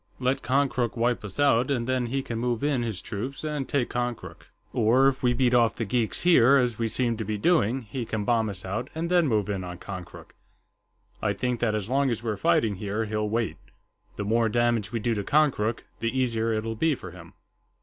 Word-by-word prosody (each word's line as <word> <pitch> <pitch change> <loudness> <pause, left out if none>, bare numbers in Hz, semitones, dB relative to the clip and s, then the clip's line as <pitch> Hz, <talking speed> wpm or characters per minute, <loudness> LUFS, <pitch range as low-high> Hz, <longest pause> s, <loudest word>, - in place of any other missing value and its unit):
Let 130 +1 0
Konkrook 130 -2 0
wipe 120 0 +1
us 100 +5 -7
out, 130 -3 +3
and 125 -4 0
then 130 -1 0
he 135 +3 -2
can 115 -3 -4
move 120 0 -1
in 145 -4 +1
his 110 -6 -4
troops 130 +9 -5
and 150 -3 -3
take 135 -4 0
Konkrook. 120 -1 -4 0.2
Or, 125 +5 +4
if 135 -1 0
we 125 -1 +2
beat 125 -1 +2
off 120 -2 +4
the 115 - -2
geeks 115 +1 -1
here, 140 -7 +6
as 125 -4 0
we 115 - +1
seem 115 0 0
to 110 - -3
be 105 0 -3
doing, 130 - +2
he 115 +4 -5
can 110 -2 -3
bomb 115 -2 +2
us 95 -2 -7
out 110 +8 -3
and 170 +2 -3
then 175 -3 +4
move 105 -6 +1
in 100 -3 -3
on 90 0 -7
Konkrook. 90 -2 -9 0.9
I 105 -2 +1
think 125 +3 -2
that 110 -2 +1
as 105 -2 -3
long 135 +2 +2
as 115 -1 -2
we're 110 -3 -1
fighting 100 +2 +2
here, 105 +3 -2
he'll 105 0 -2
wait. 110 -7 -1 0.6
The 105 - -4
more 115 +2 +2
damage 120 -2 +1
we 115 - -2
do 115 +2 0
to 105 -2 -2
Konkrook, 130 -5 +1 0.2
the 115 - 0
easier 115 -3 +1
it'll 110 +1 -2
be 155 +6 +2
for 90 -7 -9
him." 85 -1 -13
115 Hz, 220 wpm, -26 LUFS, 105-130 Hz, 0.9 s, here